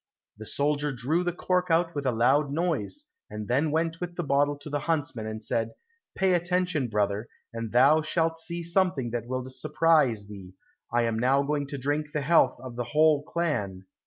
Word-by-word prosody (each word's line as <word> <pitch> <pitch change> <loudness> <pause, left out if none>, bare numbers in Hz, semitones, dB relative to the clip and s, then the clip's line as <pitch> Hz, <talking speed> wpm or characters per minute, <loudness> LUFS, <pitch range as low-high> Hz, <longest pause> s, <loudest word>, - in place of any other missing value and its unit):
The 110 - -7
soldier 145 +1 0
drew 135 +8 0
the 175 - 0
cork 180 +1 0
out 165 +1 +2
with 145 -2 -3
a - - +3
loud 135 +5 +2
noise, 170 - -2 0.2
and 105 -1 -6
then 140 +6 +1
went 165 +2 -1
with 175 -1 -5
the 175 - -2
bottle 145 0 +1
to 145 - -11
the 145 0 -2
huntsman 145 -7 -2
and 110 0 -6
said, 115 +1 -1 0.4
"Pay 190 -1 +3
attention, 175 -5 0
brother, 105 0 -1 0.3
and 115 -1 -5
thou 135 +6 +5
shalt 165 +1 0
see 170 +1 -5
something 170 -8 0
that 120 -1 -3
will 130 0 -3
surprise 150 -5 +2
thee; 100 -3 -11 0.4
I 120 0 +2
am 115 -1 0
now 135 +3 +3
going 145 0 -1
to 140 0 -5
drink 145 +3 -2
the 150 - -1
health 140 -4 +3
of 125 -2 -8
the 120 - -2
whole 150 +4 +3
clan." 125 - -2
145 Hz, 190 wpm, -27 LUFS, 120-165 Hz, 0.4 s, thou